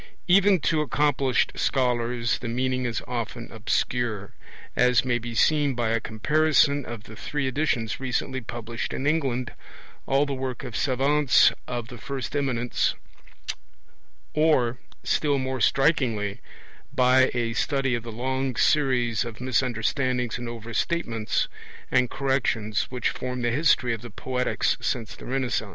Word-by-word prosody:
Even 195 +1 +5
to 155 0 +2
accomplished 140 -3 +1
scholars 120 -2 0
the 120 - -5
meaning 130 +2 -1
is 115 - -3
often 120 -1 -4
obscure, 110 -1 -1 0.4
as 125 -1 +4
may 120 -1 +1
be 120 0 -6
seen 145 0 +3
by 120 -2 0
a 115 +1 +2
comparison 145 +5 +2
of 115 -2 -7
the 110 - -11
three 145 +4 -3
editions 130 -5 -1
recently 130 0 -2
published 115 0 -5
in 135 - -3
England, 135 -5 0 0.5
all 135 +2 +3
the 140 - -3
work 130 +1 -4
of 125 -4 -6
savants 140 +1 +4 0.2
of 120 -2 -4
the 120 - -9
first 135 +2 -5
eminence, 125 -4 0 1.4
(1) 150 - +2
or, 125 -6 +3 0.2
still 145 -2 +1
more 130 -1 -2
strikingly, 120 -10 +2 0.5
by 130 +1 +4
a 115 -1 0
study 135 +1 0
of 120 - -1
the 115 +1 -7
long 130 +2 -2
series 125 -6 +2
of 115 -3 -8
misunderstandings 125 0 0
and 120 - -5
overstatements 115 +1 -1 0.4
and 125 -1 +3
corrections 120 -6 0
which 125 -2 -1
form 125 -1 -4
the 120 - +1
history 130 -3 +3
of 115 - -5
the 120 - -8
Poetics 125 +4 -1
since 115 -4 -2
the - - -11
Renaissance. 125 -5 -1
125 Hz, 140 wpm, -25 LUFS, 120-135 Hz, 1.4 s, Even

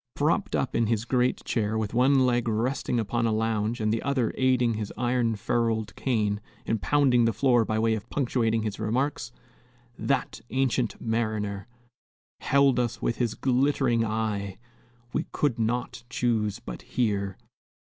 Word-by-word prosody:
Propped - - +1
up - - -1
in 115 -1 +2
his 115 0 0
great 125 0 +1
chair, 110 -1 0
with 110 -1 -2
one 130 +2 +4
leg 120 -1 +1
resting 120 +2 0
upon 115 +2 0
a - - +1
lounge 110 +1 0
and 110 0 +1
the 115 - -1
other 135 -5 0
aiding 125 -3 +2
his 105 -1 -4
iron 120 -1 +1
ferruled 110 -1 -1
cane 105 -5 0 0.2
in 115 - 0
pounding 130 -2 +3
the 115 - +2
floor 120 +1 +3
by 110 - -1
way 110 0 +2
of 110 -2 -5
punctuating 115 -5 0
his 105 -2 -4
remarks, 125 +4 -1 0.7
"that 135 -2 -1
ancient 130 -3 0
mariner" 110 -3 -2 0.7
"Held 140 -2 +3
us 120 -2 -1
with 115 - -1
his 120 -3 -1
glittering 130 -2 +2
eye; 105 -3 -2 0.6
We - - -1
could 135 -6 0
not 115 +1 -2
choose 110 -5 0
but - - -8
hear." 100 -5 -1
115 Hz, 155 wpm, -27 LUFS, 110-125 Hz, 0.7 s, one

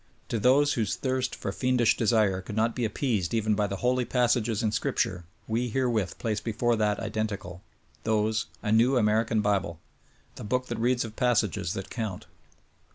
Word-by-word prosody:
To 115 - -1
those 140 +6 +4
whose 110 -5 -1
thirst 130 -1 -1
for 100 - -4
fiendish 125 +1 +2
desire 105 -5 +2
could 100 +3 -7
not 115 +1 +1
be 125 - 0
appeased 110 - -1
even 110 -1 +1
by 105 0 +1
the 100 - -4
holy 125 0 +2
passages 120 -3 +1
in 110 - +1
scripture 90 -4 -1 0.2
we 120 +2 -1
herewith 115 -6 0
place 110 -2 -1
before 120 +1 0
that 105 -1 +1
identical 105 -5 -4 0.4
(those) 110 0 +1 0.2
a 105 - -1
new 120 +4 +4
American 110 0 +2
bible: 100 -5 0 0.6
The - - -7
book 125 +4 -1
that 120 -1 -3
reads 120 +1 +1
of 110 -1 -9
passages 110 - +1
that 95 - -6
count. 110 -6 -4
110 Hz, 170 wpm, -27 LUFS, 105-120 Hz, 0.6 s, those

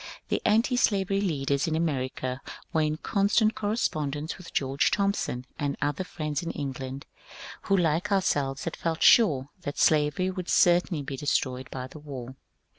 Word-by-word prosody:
The - - 0
antislavery 210 -4 +2
leaders 140 -6 0
in 160 - 0
America 130 -4 -2 0.3
were 160 - +3
in 155 0 0
constant 210 +5 +2
correspond 180 - -1
ence 150 +3 -4
with 180 - -12
George 135 0 +1
Thompson 200 -11 -1
and 145 -2 -1
other 145 +5 -1
friends 150 -5 -3
in 170 - -4
England 135 -1 -5 0.6
who 195 - +3
like 170 +3 +1
ourselves 145 -8 +1
had 165 - -3
felt 165 -1 -2
sure 145 - +5
that 145 -5 -5
slavery 155 +4 +3
would 185 -1 -6
certainly 175 -3 +3
be 135 -1 -5
destroyed 130 -2 -1
by 130 -1 -5
the 135 +4 -11
war. 130 -4 -8
155 Hz, 155 wpm, -27 LUFS, 135-185 Hz, 0.6 s, sure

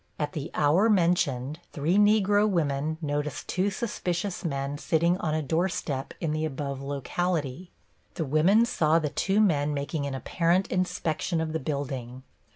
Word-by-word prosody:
At 150 -1 -2
the 150 -1 -4
hour 160 +9 +4
mentioned, 165 - +1
three 155 +5 0
Negro 210 0 +4
women 155 -3 0
noticed 145 0 -3
two 190 +2 +1
suspicious 190 -4 -3
men 140 -2 -3
sitting 170 +3 +2
on 155 -2 -1
a 155 - -1
door 165 +6 +1
step 135 -6 -4
in 165 -3 -1
the 155 +1 -1
above 140 -2 -3
locality. 150 +3 -2 0.5
The 160 - -2
women 170 - +4
saw 160 -9 +2
the 155 -3 0
two 195 +7 +1
men 150 -8 +2
making 140 +1 -2
an 135 - -4
apparent 170 +7 +1
inspection 170 -2 -1
of 160 -1 -2
the 160 - 0
building. 130 -3 -4
155 Hz, 160 wpm, -27 LUFS, 145-180 Hz, 0.5 s, hour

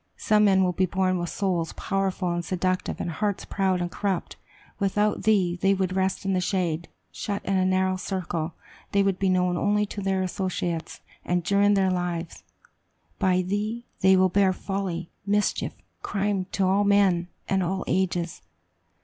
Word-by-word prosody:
Some 210 -1 +3
men 190 -1 +4
will 180 - +2
be 185 +1 +1
born 185 0 +1
with 175 -1 -3
souls 180 -5 -1
powerful 195 -2 -1
and 175 0 -2
seductive, 185 +1 -1
and 170 - -2
hearts 205 +3 -2
proud 190 -2 0
and 175 0 -2
corrupt. 195 -4 -2 0.4
Without 205 +1 +1
thee, 185 -5 +2
they 195 0 +4
would 185 -1 -1
rest 190 +1 0
in 195 - +1
the 185 - +1
shade; 175 -3 -1 0.2
shut 200 -2 -4
in 195 - 0
a 185 -1 +3
narrow 185 0 +2
circle, 175 -4 -3 0.4
they 200 0 +4
would 195 -2 0
be 195 - +2
known 180 -1 +2
only 210 +3 +2
to 205 0 -6
their 190 -1 0
associates, 180 -3 -3 0.2
and 175 0 0
during 200 +3 +3
their 190 -1 +3
lives. 175 -2 -3 0.8
By 185 -2 +2
thee, 210 +5 -2
they 190 0 +5
will 185 0 +4
bear 190 0 +3
folly, 185 -3 -4 0.2
mischief, 205 +1 +1
and - - -35
crime 200 -2 -1
to 195 - +1
all 195 +2 +3
men 195 -4 +3 0.2
and 195 0 +1
all 185 +2 -1
ages. 175 - -1
190 Hz, 175 wpm, -26 LUFS, 180-200 Hz, 0.8 s, they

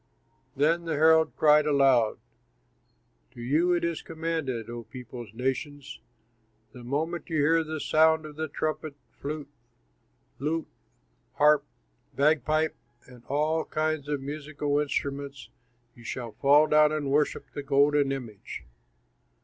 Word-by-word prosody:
Then 165 +5 +2
the 165 - -2
herald 160 +1 +4
cried 150 0 +5
aloud, 135 -6 +3 1.2
"To - - -12
you 150 +9 +2
it 175 - 0
is 170 -1 -1
commanded, 160 -8 -3
O 120 0 -6
peoples, 125 -2 -9
nations: 135 +4 -4 0.7
'The 125 - -12
moment 160 +8 -3
you 165 - -2
hear 165 +3 +3
the 155 0 -5
sound 155 +2 +3
of 150 -1 -9
the 160 +1 -3
trumpet, 155 0 -3 0.2
flute, 145 0 -6 0.9
lute, 155 +3 -1 0.7
harp, 150 0 +4 0.5
bagpipe, 155 +2 +2 0.3
and 125 -2 -16
all 155 +3 0
kinds 155 -2 -2
of 145 -2 -1
musical 145 0 -2
instruments, 140 -1 -3 0.4
you 120 - -16
shall 115 0 -5
fall 145 +6 +5
down 150 0 +4
and 150 -3 -2
worship 150 +1 0
the 145 - -4
golden 140 0 +3
image. 120 -7 -7
145 Hz, 125 wpm, -27 LUFS, 135-155 Hz, 1.2 s, cried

